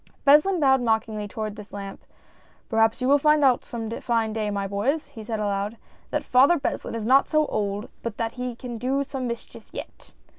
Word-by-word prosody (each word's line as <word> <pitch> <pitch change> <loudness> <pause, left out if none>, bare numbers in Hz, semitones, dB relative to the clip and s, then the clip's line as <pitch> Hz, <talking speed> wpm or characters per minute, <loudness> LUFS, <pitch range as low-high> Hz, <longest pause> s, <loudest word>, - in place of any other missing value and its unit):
Beslin 300 +6 +5
bowed 265 -3 +4
mockingly 220 -2 0
towards 215 0 -5
this 210 -1 -11
lamp. 200 -1 -7 0.4
" - - -33
Perhaps 225 +2 +2
you - - +2
will 285 +1 +5
find 300 +1 +4
out 260 -3 +4
some 230 -2 -5
fine 230 -3 0
day, 215 -1 -1
my 200 -1 -2
boys," 250 +10 -1
he 230 -6 -10
said 220 0 -3
aloud, 205 +1 -2 0.2
" - - -32
that - - -1
Father 275 +7 +5
Beslin 275 - -3
is 225 -2 -3
not 265 +4 +4
so 310 -1 +3
old 205 -4 -2
but 230 -3 -5
that 230 -1 -1
he 250 -1 -5
can 240 -1 -7
do 265 +4 0
some 265 -2 -4
mischief 235 0 -7
yet - - -9
230 Hz, 210 wpm, -25 LUFS, 215-270 Hz, 0.4 s, Beslin